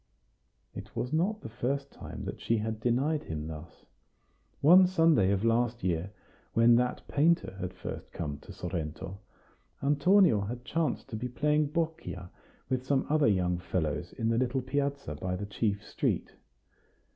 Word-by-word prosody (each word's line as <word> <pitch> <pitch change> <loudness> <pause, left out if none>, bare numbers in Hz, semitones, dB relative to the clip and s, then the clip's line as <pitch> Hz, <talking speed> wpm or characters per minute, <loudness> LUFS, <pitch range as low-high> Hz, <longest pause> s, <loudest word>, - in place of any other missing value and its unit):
It - - -9
was 125 +4 -2
not 195 +7 +1
the - - -7
first 135 +4 -2
time - - -8
that - - -6
she 115 - +1
had 110 0 -3
denied 135 +7 +1
him 75 -1 -4
thus. 80 +1 -9 0.7
One 180 +5 +7
Sunday 165 - +4
of 100 +2 +1
last 120 0 +1
year, 90 0 0 0.4
when 115 +1 +6
that 125 0 -1
painter 160 - +2
had 90 -1 -3
first 90 - -7
come 75 -4 -4
to - - -12
Sorrento, 85 +1 -5 0.6
Antonio 150 - +4
had 120 +5 -5
chanced 155 -1 -1
to 110 - -5
be 125 +3 -3
playing 150 +4 +2
boccia 155 - -3 0.4
with 130 -1 -1
some 135 0 +1
other 155 -3 +4
young 90 -4 +2
fellows 85 -1 -2
in 115 -1 -1
the 115 0 +2
little 130 +1 0
piazza 140 - -2
by 90 +5 -3
the 100 +3 -4
chief 105 0 -1
street. - - -1
120 Hz, 155 wpm, -30 LUFS, 95-145 Hz, 0.7 s, One